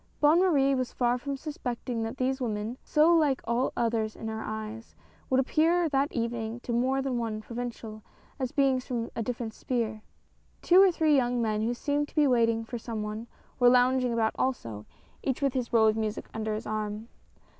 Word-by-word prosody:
Bonne 305 Hz, +3 st, +5 dB
Marie 285 Hz, -7 st, +3 dB
was 255 Hz, -2 st, -1 dB
far 245 Hz, 0 st, +1 dB
from 280 Hz, +2 st, -4 dB
suspecting 250 Hz, -5 st, -4 dB
that 225 Hz, +3 st, -4 dB
these 260 Hz, +1 st, -1 dB
women, 220 Hz, 0 st, -2 dB
so 315 Hz, +3 st, +4 dB
like 295 Hz, -5 st, +3 dB
all 235 Hz, +3 st, 0 dB
others 225 Hz, -2 st, 0 dB
in 220 Hz, -, -6 dB
her 220 Hz, 0 st, -4 dB
eyes, 220 Hz, +1 st, -6 dB, 0.3 s
would 260 Hz, -1 st, +3 dB
appear 325 Hz, +6 st, +2 dB
that 280 Hz, -1 st, +1 dB
evening 230 Hz, -1 st, -3 dB
to 240 Hz, -, -4 dB
more 260 Hz, +3 st, +1 dB
than 260 Hz, -3 st, -1 dB
one 225 Hz, -2 st, -3 dB
provincial, 230 Hz, -1 st, -6 dB, 0.4 s
as 260 Hz, -2 st, -2 dB
beings 270 Hz, -3 st, +2 dB
from 235 Hz, -2 st, -3 dB
a -, -, -2 dB
different 230 Hz, -1 st, -4 dB
sphere. 225 Hz, -3 st, -2 dB, 0.6 s
Two 360 Hz, +2 st, +7 dB
or 390 Hz, -1 st, +6 dB
three 315 Hz, -3 st, +3 dB
young 245 Hz, -2 st, +1 dB
men 215 Hz, -2 st, 0 dB
who 235 Hz, +2 st, 0 dB
seemed 290 Hz, +3 st, -1 dB
to -, -, -21 dB
be 300 Hz, -2 st, +4 dB
waiting 230 Hz, -3 st, +2 dB
for 240 Hz, +1 st, -5 dB
some 220 Hz, -2 st, -4 dB
one, 215 Hz, +2 st, -5 dB, 0.3 s
were 245 Hz, -1 st, +7 dB
lounging 250 Hz, 0 st, +3 dB
about 225 Hz, -1 st, +1 dB
also, 115 Hz, -, -2 dB, 0.3 s
each 265 Hz, -2 st, -1 dB
with 275 Hz, -2 st, +1 dB
his 250 Hz, -3 st, -2 dB
roll 225 Hz, -2 st, +5 dB
of 215 Hz, -, +3 dB
music 220 Hz, -1 st, -3 dB
under 220 Hz, -1 st, -2 dB
his 215 Hz, -, -6 dB
arm. 215 Hz, +1 st, -3 dB
240 Hz, 195 wpm, -28 LUFS, 220-270 Hz, 0.6 s, Two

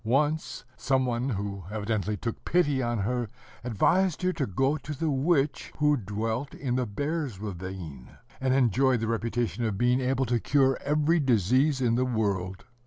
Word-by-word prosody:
Once, 145 Hz, +7 st, 0 dB
some 130 Hz, -1 st, +1 dB
one 125 Hz, +1 st, -1 dB
who 100 Hz, -3 st, -3 dB
evidently 105 Hz, -1 st, -2 dB
took 115 Hz, +1 st, -5 dB
pity 145 Hz, -6 st, +2 dB
on 120 Hz, -1 st, -1 dB
her 120 Hz, +2 st, -1 dB, 0.3 s
advised 170 Hz, -, +2 dB
her 185 Hz, 0 st, +2 dB
to 145 Hz, -6 st, -2 dB
go 135 Hz, +10 st, +1 dB
to 150 Hz, 0 st, -6 dB
the 160 Hz, 0 st, 0 dB
witch 145 Hz, +1 st, +1 dB
who 150 Hz, 0 st, +3 dB
dwelt 110 Hz, +4 st, -3 dB
in 125 Hz, -3 st, -2 dB
the 125 Hz, -1 st, 0 dB
Bear's 145 Hz, -, -3 dB
ravine, 90 Hz, -9 st, -7 dB, 0.3 s
and 130 Hz, 0 st, 0 dB
enjoyed 130 Hz, 0 st, +3 dB
the 115 Hz, -, -2 dB
reputation 115 Hz, -2 st, -1 dB
of 110 Hz, -4 st, -1 dB
being 125 Hz, +3 st, +3 dB
able 130 Hz, +1 st, +1 dB
to 120 Hz, 0 st, +1 dB
cure 135 Hz, +1 st, +3 dB
every 150 Hz, +3 st, +2 dB
disease 130 Hz, -, +2 dB
in 120 Hz, -2 st, +2 dB
the 125 Hz, +2 st, +2 dB
world. 100 Hz, -6 st, -2 dB
125 Hz, 170 wpm, -27 LUFS, 110-140 Hz, 0.3 s, who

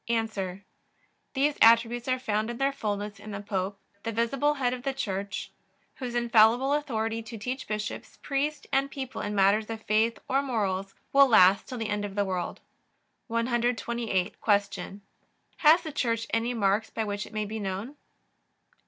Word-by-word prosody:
A. 210 Hz, -5 st, -1 dB, 0.8 s
These 285 Hz, +2 st, +2 dB
attributes 230 Hz, +1 st, +5 dB
are 255 Hz, 0 st, +2 dB
found 220 Hz, -3 st, -1 dB
in 240 Hz, -, -4 dB
their 275 Hz, +2 st, +2 dB
fullness 210 Hz, -5 st, -4 dB
in 215 Hz, -, -10 dB
the 200 Hz, -1 st, -5 dB
Pope, 200 Hz, -1 st, -3 dB, 0.2 s
the 230 Hz, -, -3 dB
visible 275 Hz, +6 st, +1 dB
Head 250 Hz, -3 st, 0 dB
of 250 Hz, -, -5 dB
the 270 Hz, +1 st, -2 dB
Church, 200 Hz, -5 st, -3 dB, 0.5 s
whose 245 Hz, -3 st, -5 dB
infallible 240 Hz, +3 st, +4 dB
authority 230 Hz, -6 st, -1 dB
to 225 Hz, +1 st, -8 dB
teach 250 Hz, +5 st, -4 dB
bishops, 210 Hz, -1 st, -5 dB
priests, 290 Hz, +2 st, -1 dB
and 275 Hz, +1 st, +2 dB
people 265 Hz, -3 st, -5 dB
in 205 Hz, 0 st, -3 dB
matters 200 Hz, +3 st, +3 dB
of 225 Hz, -1 st, -5 dB
faith 220 Hz, +2 st, +2 dB
or 270 Hz, +1 st, +2 dB
morals 195 Hz, -7 st, -2 dB, 0.2 s
will 275 Hz, 0 st, +7 dB
last 195 Hz, -5 st, +6 dB
till 255 Hz, -, -5 dB
the 225 Hz, -2 st, -3 dB
end 210 Hz, 0 st, -1 dB
of 200 Hz, -1 st, -5 dB
the 205 Hz, -1 st, +1 dB
world. 185 Hz, -2 st, -3 dB, 0.7 s
128. 235 Hz, -4 st, 0 dB
Q. 200 Hz, -2 st, 0 dB, 0.6 s
Has 315 Hz, +2 st, +6 dB
the 315 Hz, -, -5 dB
Church 230 Hz, -5 st, 0 dB
any 230 Hz, +2 st, 0 dB
marks 205 Hz, 0 st, +1 dB
by 225 Hz, -, -2 dB
which 205 Hz, -1 st, -3 dB
it -, -, -14 dB
may 215 Hz, -1 st, -1 dB
be 220 Hz, +2 st, -5 dB
known? 200 Hz, +7 st, -4 dB
225 Hz, 170 wpm, -28 LUFS, 205-250 Hz, 0.8 s, will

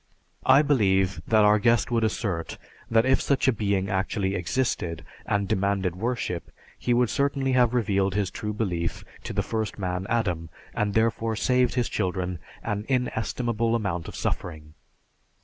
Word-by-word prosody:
I 140 Hz, +3 st, +7 dB
believe 95 Hz, -, +2 dB
that 110 Hz, -1 st, +4 dB
our 105 Hz, +1 st, +5 dB
guest 115 Hz, +3 st, +2 dB
would 115 Hz, -1 st, +2 dB
assert 100 Hz, -6 st, -2 dB, 0.3 s
that 115 Hz, 0 st, +4 dB
if 130 Hz, 0 st, +3 dB
such 140 Hz, -1 st, +1 dB
a 130 Hz, -, +5 dB
Being 100 Hz, -3 st, 0 dB
actually 95 Hz, 0 st, -1 dB
existed 85 Hz, -, -2 dB, 0.2 s
and 100 Hz, -1 st, 0 dB
demanded 95 Hz, -2 st, 0 dB
worship, 110 Hz, -4 st, -3 dB, 0.3 s
he 125 Hz, -, -1 dB
would 120 Hz, -1 st, +3 dB
certainly 140 Hz, -1 st, 0 dB
have 125 Hz, -1 st, +3 dB
revealed 100 Hz, -5 st, +1 dB
his 100 Hz, -2 st, 0 dB
true 105 Hz, -, -4 dB
belief 90 Hz, -6 st, -2 dB, 0.2 s
to -, -, -4 dB
the -, -, -1 dB
first 110 Hz, -3 st, -3 dB
man 90 Hz, -1 st, -3 dB
Adam, 90 Hz, -8 st, -1 dB, 0.2 s
and 105 Hz, -1 st, -1 dB
therefore 115 Hz, 0 st, +1 dB
saved 125 Hz, +2 st, +2 dB
his 125 Hz, -2 st, +1 dB
children 90 Hz, -3 st, -2 dB, 0.2 s
an 105 Hz, +1 st, -3 dB
inestimable 120 Hz, -2 st, 0 dB
amount 90 Hz, -7 st, -2 dB
of -, -, -8 dB
suffering. 75 Hz, -3 st, -4 dB
105 Hz, 155 wpm, -26 LUFS, 95-120 Hz, 0.3 s, I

